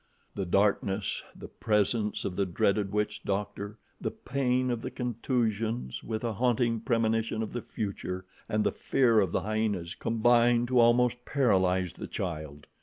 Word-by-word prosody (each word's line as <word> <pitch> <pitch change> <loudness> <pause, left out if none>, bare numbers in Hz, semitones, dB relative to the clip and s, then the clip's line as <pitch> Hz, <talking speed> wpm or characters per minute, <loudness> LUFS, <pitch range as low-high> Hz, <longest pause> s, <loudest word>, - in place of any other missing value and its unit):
The 95 - -3
darkness, 100 +1 +1
the - - -9
presence 105 0 0
of 90 - -3
the 100 0 0
dreaded 100 +3 +1
witch 105 0 -1
doctor, 100 +1 -3 0.2
the - - -1
pain 130 -1 0
of 120 -2 -2
the - - -4
contusions, 115 - -2
with 110 0 -4
a 115 -2 -1
haunting 120 0 +1
premonition 115 -1 0
of 110 - -6
the 120 - -3
future, 95 -4 -4 0.2
and 105 0 +1
the - - +2
fear 120 -5 +3
of 95 -5 +1
the - - 0
hyenas 105 -5 -1
combined 120 +1 +3
to 125 -1 +4
almost 120 +1 +4
paralyze 95 - +2
the - - -7
child. 75 -5 -5
110 Hz, 155 wpm, -29 LUFS, 100-120 Hz, 0.2 s, to